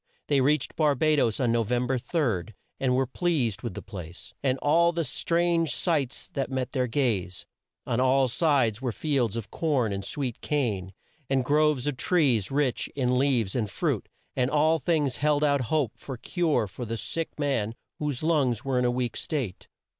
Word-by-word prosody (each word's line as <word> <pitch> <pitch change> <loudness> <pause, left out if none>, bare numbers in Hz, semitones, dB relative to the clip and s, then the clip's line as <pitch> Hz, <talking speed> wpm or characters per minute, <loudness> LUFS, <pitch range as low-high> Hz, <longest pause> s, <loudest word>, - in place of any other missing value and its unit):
They 140 -2 +4
reached 145 +1 +1
Bar 150 -3 +3
ba 155 +3 +3
does 115 -6 +1
on 125 -3 +2
No 115 0 +2
vem 120 +3 0
ber 130 0 0
3, 120 - -1 0.2
and 130 -2 +2
were 135 +1 +2
pleased 130 - 0
with 115 -7 -5
the - - -6
place, 90 -2 -9
and 135 -2 +1
all 170 +5 +3
the 170 -1 -1
strange 170 +4 +1
sights 150 -7 -1
that 135 -1 -3
met 130 -2 -2
their 130 -4 0
gaze. 110 -9 -1 0.4
On 120 - 0
all 130 +1 +4
sides 125 -5 +2
were 125 -2 -1
fields 125 -5 0
of 115 - -6
corn 135 -10 0
and 100 0 -4
sweet 125 +2 -4
cane, 105 -11 -1 0.4
and 135 -2 +1
groves 150 -2 +2
of 145 -3 -1
trees 135 - +2
rich 140 -2 0
in 125 -2 +1
leaves 125 -8 +1
and 110 -5 0
fruit, 90 - -1 0.3
and 125 -1 +1
all 155 +2 +3
things 150 -7 0
held 150 0 +2
out 145 -1 +3
a - - -1
hope 140 -2 0 0.2
of 130 -3 -5
cure 165 - +1
for 100 +5 -8
the 115 0 -3
sick 165 +7 -4
man, 120 -7 0 0.2
whose 150 -2 -2
lungs 140 -8 +1
were 130 -2 +1
in 125 - +1
a - - +3
weak 120 -1 -1
state. 130 - -4
130 Hz, 190 wpm, -27 LUFS, 120-150 Hz, 0.4 s, They